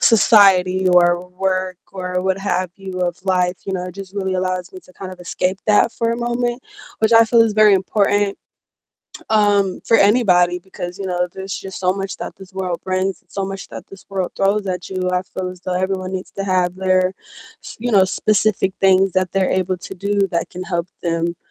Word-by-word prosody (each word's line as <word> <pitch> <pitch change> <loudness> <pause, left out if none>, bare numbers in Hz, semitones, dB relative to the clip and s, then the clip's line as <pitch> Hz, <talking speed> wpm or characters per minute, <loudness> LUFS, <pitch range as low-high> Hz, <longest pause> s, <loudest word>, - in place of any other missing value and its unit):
society 190 -4 +5
or 175 0 +3
work 185 -1 -2
or 180 -1 -3
what 190 0 0
have 185 -2 -1
you 190 -2 -7
of 175 -1 -1
life, 180 -1 +1
you 195 - -3
know, 180 -1 -2
it 180 - -9
just 195 0 -9
really 190 -2 -2
allows 185 0 -2
me 185 - -10
to 185 +1 -20
kind 185 0 -8
of 185 - -12
escape 185 +2 -1
that 215 +2 +4
for 230 0 -1
a - - -2
moment, 240 +1 -2 0.4
which 220 +1 +2
I 225 0 +8
feel 230 +1 +3
is 220 -2 0
very 215 -1 +6
important, 200 +1 +1 0.9
um, 205 -3 +2
for 225 - +4
anybody, 185 -5 +4
because, 180 0 -8
you 200 - -5
know, 180 -1 -1
there's 190 0 -7
just 190 -1 -8
so 185 0 +2
much 195 0 -5
that - - -7
this 190 0 -14
world 185 -3 -3
brings 185 +1 -1
and - - -40
so 195 - -3
much 195 0 -6
that - - -9
this 195 - -14
world 190 -2 -3
throws 200 +1 +1
at 180 -2 -4
you, 185 -1 -2
I 180 - +2
feel 185 0 -5
as 180 -1 -12
though 185 -1 -3
everyone 185 0 -2
needs 185 - -5
to - - 0
have 180 -2 +1
their 185 -1 +2 0.5
s - - -9
you 245 +1 -2
know, 195 -2 +6
specific 205 0 +1
things 190 0 +4
that 185 -1 0
they're 190 -1 +1
able 185 0 0
to 190 - -9
do 200 +1 0
that 170 0 -1
can 185 0 -7
help 175 -1 -2
them, 170 0 -1
190 Hz, 210 wpm, -19 LUFS, 180-200 Hz, 0.9 s, I